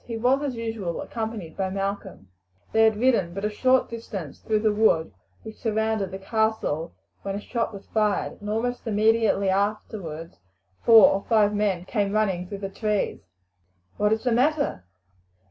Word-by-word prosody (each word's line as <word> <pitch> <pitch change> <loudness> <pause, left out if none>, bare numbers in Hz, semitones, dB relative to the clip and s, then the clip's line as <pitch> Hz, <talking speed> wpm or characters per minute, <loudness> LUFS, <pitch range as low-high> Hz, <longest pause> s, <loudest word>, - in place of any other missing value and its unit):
He 230 -1 -4
was, 255 +4 +2
as 280 -4 -2
usual, 225 -7 -4
accompanied 220 -7 -5
by 190 -1 -1
Malcolm. 195 - -4 0.4
They 225 0 +5
had 220 -1 +3
ridden 215 -8 +2
but 195 +1 -3
a 210 - 0
short 255 +4 +3
distance 205 -9 -7
through 215 -1 0
the 215 -1 +2
wood 205 -7 +2 0.3
which 220 -1 -9
surrounded 220 -3 0
the 190 - -6
castle 195 -6 -1 0.3
when 195 0 -4
a - - -3
shot 230 +2 -2
was 200 -2 -10
fired, 210 -2 -1
and 210 - -6
almost 240 +3 -2
immediately 215 -2 +2
afterwards 190 - -3 0.4
four 225 -3 +8
or 195 +1 -1
five 210 -3 +4
men 200 -4 0
came 200 -1 -1
running 190 -4 0
through 200 - -6
the - - -4
trees. 210 +1 -1 0.8
"What 210 0 +2
is 220 0 0
the 250 - +1
matter?" 275 - +1
210 Hz, 165 wpm, -25 LUFS, 195-225 Hz, 0.8 s, four